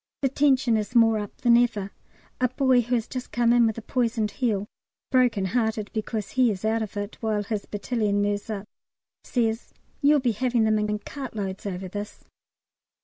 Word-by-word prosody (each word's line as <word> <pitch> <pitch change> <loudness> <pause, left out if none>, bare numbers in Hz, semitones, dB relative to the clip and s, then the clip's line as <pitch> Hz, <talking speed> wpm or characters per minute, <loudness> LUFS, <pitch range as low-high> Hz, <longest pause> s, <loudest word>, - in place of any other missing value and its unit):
The 270 - +3
tension 265 -4 +3
is 215 +3 -4
more 225 -2 +5
up 205 -1 -8
than 240 -1 +5
ever. 215 -5 +1 0.5
A 255 - +3
boy 255 -1 +3
who 240 +2 -1
has 230 -1 -1
just 255 -1 -6
come 235 0 +3
in 240 -1 +5
with 220 - -2
a 230 - -6
poisoned 230 -3 0
heel 205 -2 -1 0.5
(broken 245 -6 +3
hearted 220 0 -1
because 215 -1 -3
he 255 -2 +3
is 205 -1 -3
out 225 +1 +1
of 210 -1 -5
it, 205 +1 -5
while 215 -2 0
his 205 0 -4
battalion 210 -1 -1
moves 205 +2 -1
up) 210 -1 -4 0.6
says, 225 -1 -1 0.3
"You'll 295 0 +5
be 250 -3 +1
having 240 +1 +1
them 215 -1 +3
in 210 0 -1
in 210 - 0
cartloads 210 -6 -6
over 190 -1 -4
this." 205 +2 -7
220 Hz, 190 wpm, -25 LUFS, 205-245 Hz, 0.6 s, more